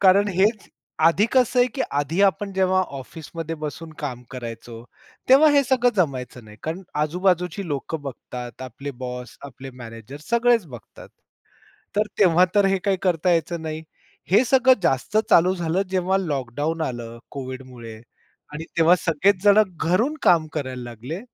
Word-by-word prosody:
कारण 200 +2 +5
हेच 200 +4 +1 0.4
आधी 195 +6 +4
कसं 255 -1 +3
आहे 245 - +5
की 265 - -1
आधी 145 +6 -1
आपण 200 +1 +1
जेव्हा 185 0 +2 0.2
ऑफिसमध्ये 165 +3 -7
बसून 155 +2 -6
काम 125 -5 -5
करायचो, 115 -2 -8 0.4
तेव्हा 275 +4 +7
हे 285 -1 +4
सगळं 245 -1 +2
जमायचं 130 -7 -2
नाही, 105 0 -14
कारण 165 +4 -4 0.2
आजूबाजूची 180 +3 0
लोक 145 +1 -4
बघतात, 125 -3 -8
आपले 130 +3 -7
बॉस 125 0 -6
आपले 135 0 -10
मॅनेजर 115 0 -10
सगळेच 235 -3 +3
बघतात. 120 -8 -12 0.9
तर 210 +1 +2
तेव्हा 180 -2 +5
तर 205 -1 +4
हे 195 0 +2
काही 200 -2 +2
करता 180 -1 +1
यायचं 170 0 0
नाही. 155 0 -5 0.5
हे 210 +7 +5
सगळं 260 +1 +5
जास्त 135 +6 0
चालू 180 +2 +5
झालं 175 +1 -1
जेव्हा 190 0 +1
लॉकडाउन 145 -1 -3
आलं 120 -4 -5
कोव्हिडमुळे 130 -4 -8 0.6
आणि 150 +2 -6
तेव्हा 165 +2 +6
सगळेच 180 +4 +1
जण 205 +1 +7 0.2
घरून 195 - +1
काम 165 -3 +4
करायला 130 -4 -4
लागले. 120 - -7
165 Hz, 150 wpm, -23 LUFS, 130-195 Hz, 0.9 s, तेव्हा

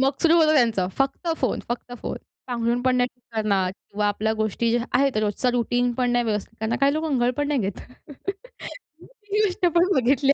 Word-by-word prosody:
मग 270 +1 +4
सुरू 335 0 +5
होतं 310 -2 +5
त्यांचं 230 -9 +2
फक्त 275 +5 -1
फोन, 255 - 0
फक्त 240 +1 -4
फोन, - - -3 0.3
पांघरुण 240 -1 0
पण 255 0 +2
नाही 245 0 +2
ठीक 245 - -38
करणार 200 -4 +1
किंवा 205 +1 -4
आपल्या 210 +2 0
गोष्टी 220 +1 0
ज्या 235 0 +1
आहेत, 275 -3 +2
रोजचा 215 +4 +1
रुटीन 245 0 +1
पण 245 0 0
नाही 240 0 +2
व्यवस्थित 220 0 -3
करणार. 220 +2 -1
काही 280 0 +4
लोकं 315 +1 -1
अंघोळ 250 -4 +2
पण 290 0 -1
नाही 290 -3 +1
घेत. 195 -2 -3 1.5
ही 420 - +2
गोष्ट 365 -2 0
पण 345 0 +5
बघितली 270 +1 +3
245 Hz, 195 wpm, -24 LUFS, 220-275 Hz, 1.5 s, सुरू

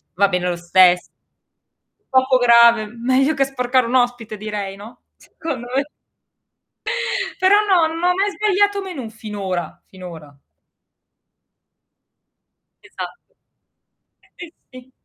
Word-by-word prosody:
va 200 +3 +3
bene 180 -1 -1
lo 175 - -2
stesso. 180 +1 +4 1.1
Poco 260 0 +4
grave, 235 -2 +5
meglio 255 +6 0
che 275 - +1
sporcare 255 -1 0
un 245 - -2
ospite 245 -3 0
direi, 205 -2 -5
no, 210 +4 -13 0.2
secondo 320 -8 -7
me. 275 +1 +1 1.6
Però 375 +2 +6
no, 360 -5 +4
non - - -6
hai 360 0 +3
mai 400 +2 0
sbagliato 405 -1 +1
menù 325 - -7
finora, 205 -6 -6
finora. 170 -6 -12 2.5
Esatto. - - -10 1.0
Si, 350 -1 -10 0.2
si. 255 0 -14
240 Hz, 110 wpm, -20 LUFS, 200-275 Hz, 2.5 s, Però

